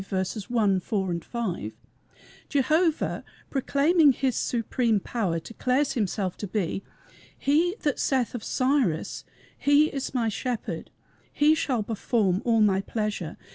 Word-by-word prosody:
1, 210 Hz, -6 st, +2 dB
4, 185 Hz, -3 st, -2 dB
5) 180 Hz, -, -4 dB, 0.8 s
Jehovah, 310 Hz, +4 st, +1 dB, 0.3 s
proclaiming 290 Hz, +3 st, +4 dB
his 260 Hz, 0 st, 0 dB
supreme 230 Hz, -1 st, 0 dB
power, 195 Hz, -5 st, -2 dB
declares 255 Hz, -, 0 dB
himself 200 Hz, -5 st, -1 dB
to 205 Hz, -, -5 dB
be 195 Hz, -1 st, -2 dB, 0.5 s
He 330 Hz, +6 st, +2 dB
"That 290 Hz, -3 st, 0 dB
saith 260 Hz, -4 st, +1 dB
of 240 Hz, -3 st, -5 dB
Cyrus 255 Hz, -, 0 dB, 0.3 s
He 290 Hz, +2 st, +4 dB
is 275 Hz, -1 st, -4 dB
my 235 Hz, -3 st, +1 dB
shepherd, 235 Hz, +2 st, -3 dB, 0.4 s
He 300 Hz, +1 st, +4 dB
shall 255 Hz, -7 st, 0 dB
perform 205 Hz, -3 st, 0 dB
all 230 Hz, -2 st, +3 dB
my 195 Hz, -2 st, +3 dB
pleasure. 210 Hz, -6 st, -3 dB
235 Hz, 120 wpm, -26 LUFS, 200-280 Hz, 0.8 s, proclaiming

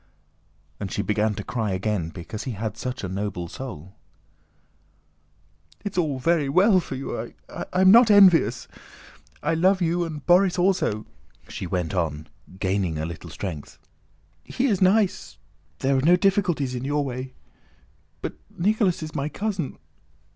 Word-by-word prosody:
And 100 Hz, -, -5 dB
she 100 Hz, -, -1 dB
began 105 Hz, +1 st, 0 dB
to 105 Hz, -, -5 dB
cry 110 Hz, -4 st, -2 dB
again 95 Hz, -3 st, -1 dB
because 90 Hz, +6 st, -7 dB
he 130 Hz, -, -3 dB
had 110 Hz, 0 st, -4 dB
such 125 Hz, -2 st, -5 dB
a -, -, -2 dB
noble 95 Hz, -2 st, -4 dB
soul. 95 Hz, -, -8 dB, 1.9 s
"It's 205 Hz, -, -4 dB
all 155 Hz, -6 st, 0 dB
very 150 Hz, +1 st, +1 dB
well 185 Hz, +6 st, +5 dB
for 150 Hz, -, -6 dB
you... 135 Hz, -, -5 dB
I -, -, -6 dB
am 185 Hz, +1 st, +5 dB
not 235 Hz, +1 st, +7 dB
envious... 175 Hz, -, +5 dB, 0.8 s
I -, -, +1 dB
love 185 Hz, +4 st, +3 dB
you 175 Hz, 0 st, +1 dB
and 155 Hz, -4 st, -6 dB
Borís 180 Hz, +1 st, +4 dB
also," 175 Hz, -, +1 dB, 0.4 s
she 95 Hz, -, -5 dB
went 90 Hz, -1 st, -2 dB
on, 80 Hz, -4 st, -2 dB, 0.3 s
gaining 95 Hz, -4 st, 0 dB
a 80 Hz, -, -2 dB
little 85 Hz, +1 st, -8 dB
strength; 80 Hz, -2 st, -7 dB, 0.7 s
"he 255 Hz, -, -2 dB
is 205 Hz, -8 st, +1 dB
nice... 195 Hz, +1 st, +2 dB, 0.4 s
there 135 Hz, +1 st, +1 dB
are 130 Hz, -, +2 dB
no 170 Hz, +6 st, +5 dB
difficulties 180 Hz, -8 st, +1 dB
in 125 Hz, 0 st, -4 dB
your 145 Hz, +1 st, 0 dB
way.... 130 Hz, 0 st, -6 dB, 0.9 s
But -, -, -3 dB, 0.2 s
Nicholas 195 Hz, -2 st, +1 dB
is 155 Hz, -, -7 dB
my 145 Hz, 0 st, -2 dB
cousin... 195 Hz, -6 st, -3 dB
135 Hz, 150 wpm, -24 LUFS, -, 1.9 s, not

